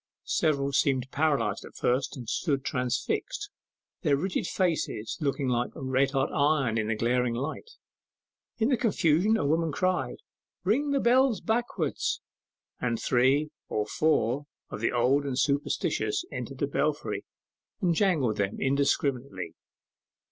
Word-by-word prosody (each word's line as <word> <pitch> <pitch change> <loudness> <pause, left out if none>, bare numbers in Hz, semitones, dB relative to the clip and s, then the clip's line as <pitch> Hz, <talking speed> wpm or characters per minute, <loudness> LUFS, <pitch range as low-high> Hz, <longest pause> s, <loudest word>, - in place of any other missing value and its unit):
Several 140 -3 +1
seemed 135 -2 +1
paralyzed 140 -9 +1
at - - -12
first, 130 +3 0
and 120 -3 -8
stood 135 +1 -1
transfixed, 410 - -2 0.5
their 145 -6 +3
rigid 180 +5 -1
faces 160 - -1
looking 140 -2 0
like 120 -1 +1
red 130 +1 +1
hot 135 0 0
iron 140 -6 +2
in 110 - -1
the 110 - 0
glaring 120 +1 +1
light. 150 - -4 0.9
In 225 +2 +2
the 260 - +3
confusion 205 -1 +3
a - - -1
woman 160 +2 +1
cried, 185 +4 0 0.5
'Ring 250 +10 +2
the 280 -1 +2
bells 255 -1 +4
backwards!' 220 - -1 0.6
and 120 -2 -1
three 135 +4 +2 0.2
or 105 - 0
four 145 - +1 0.2
of 105 - -5
the 115 - +1
old 125 +4 +3
and 135 -3 -3
superstitious 145 - 0
entered - - -5
the - - +1
belfry - - -1 0.6
and 180 -4 +2
jangled 160 - +2
them 100 0 -1
indescribably. 135 - 0
140 Hz, 135 wpm, -28 LUFS, 125-180 Hz, 0.9 s, bells